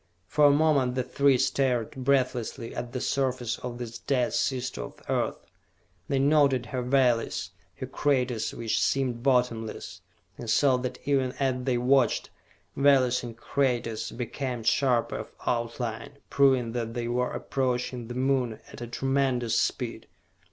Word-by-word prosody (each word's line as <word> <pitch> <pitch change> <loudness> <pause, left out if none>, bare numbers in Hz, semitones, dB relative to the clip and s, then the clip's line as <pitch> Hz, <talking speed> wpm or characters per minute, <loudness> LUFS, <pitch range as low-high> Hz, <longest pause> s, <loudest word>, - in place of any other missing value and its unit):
For 150 +7 +3
a - - +8
moment 140 -4 +3
the 130 - 0
three 135 +1 +3
stared 130 -3 +1
breathlessly 125 -3 -1
at 120 0 -5
the 125 - -3
surface 130 -3 -1
of 125 -1 -6
this 120 -1 -6
dead 125 -3 0
sister 130 -1 -1
of - - -8
the - - -8
Earth. - - 0 0.7
They 140 - 0
noted 140 -3 +3
her 125 +3 -3
valleys, 125 -2 +1 0.2
her - - -5
craters 125 -6 0
which 115 -2 -1
seemed 130 -3 0
bottomless, 125 -4 0 0.4
and 120 - -6
saw 130 +3 +4
that 125 0 -4
even 135 -2 +1
as 130 -2 -1
they 130 -2 +1
watched, 130 +1 +2 0.4
valleys 130 -3 +4
and 115 -2 -8
craters 120 -5 -1
became 125 0 -4
sharper 120 0 +2
of - - -8
outline, 120 +2 -2 0.2
proving 130 -4 +3
that 115 -1 -3
they 120 -1 -2
were 125 +1 0
approaching 125 -2 -2
the 120 - -6
Moon 130 -3 0
at - - -10
a 120 - -5
tremendous 125 -2 +1
speed. - - -3
125 Hz, 150 wpm, -27 LUFS, 120-135 Hz, 0.7 s, a